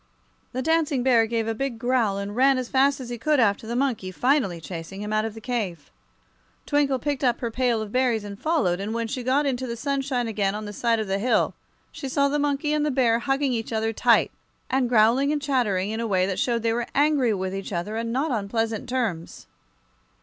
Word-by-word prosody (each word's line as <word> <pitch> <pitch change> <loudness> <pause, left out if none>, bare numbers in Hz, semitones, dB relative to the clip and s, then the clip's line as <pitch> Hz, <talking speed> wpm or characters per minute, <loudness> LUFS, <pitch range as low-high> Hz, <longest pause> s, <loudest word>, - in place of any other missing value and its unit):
The 260 +1 -3
Dancing 310 -4 +1
Bear 235 -3 +4
gave 225 -1 -1
a 225 - 0
big 260 +1 -3
growl 235 -4 +1
and 200 +1 -5
ran 265 +2 +4
as 255 -1 -3
fast 275 +1 +3
as 250 -2 -7
he 240 -1 -5
could 300 +3 +2
after 220 -1 +2
the 235 - -3
monkey, 245 -8 -1
finally 235 - +1
chasing 170 +4 -7
him 210 +1 -4
out 215 0 +1
of 225 -1 -5
the - - -8
cave. 210 - -4 0.7
Twinkle 290 -2 +2
picked 280 +2 -3
up 245 -2 +2
her 235 -2 -3
pail 240 -2 +1
of 210 - -9
berries 245 -3 +1
and 200 -1 -8
followed, 245 - +1
and 210 +3 -3
when 230 0 -1
she 255 +3 -4
got 265 +4 +1
into 260 -2 -1
the 235 0 -4
sunshine 270 -2 -1
again 205 -2 -1
on 215 0 -5
the 205 - -7
side 230 +2 +1
of 220 - -1
the 195 0 -1
hill 245 +4 +2 0.4
she 270 - -6
saw 280 0 +2
the 295 +1 0
monkey 290 +1 0
and 300 -1 +1
the 300 - +1
bear 245 -4 +2
hugging 270 +1 0
each 225 -1 -3
other 225 0 -1
tight, - - +3 0.4
and 260 -2 +1
growling 240 +5 +4
and 300 - 0
chattering 215 -9 0
in 220 - -3
a 230 - -1
way 185 -3 +2
that 190 -1 -2
showed 235 -2 0
they 225 -1 +2
were 240 0 -2
angry 285 -4 +3
with 190 -2 -2
each 195 +1 -5
other 180 +4 -3
and 230 0 -2
not 270 +5 0
on 205 -5 -2
pleasant 225 +1 -2
terms. 220 -10 -3
235 Hz, 230 wpm, -24 LUFS, 215-270 Hz, 0.7 s, Bear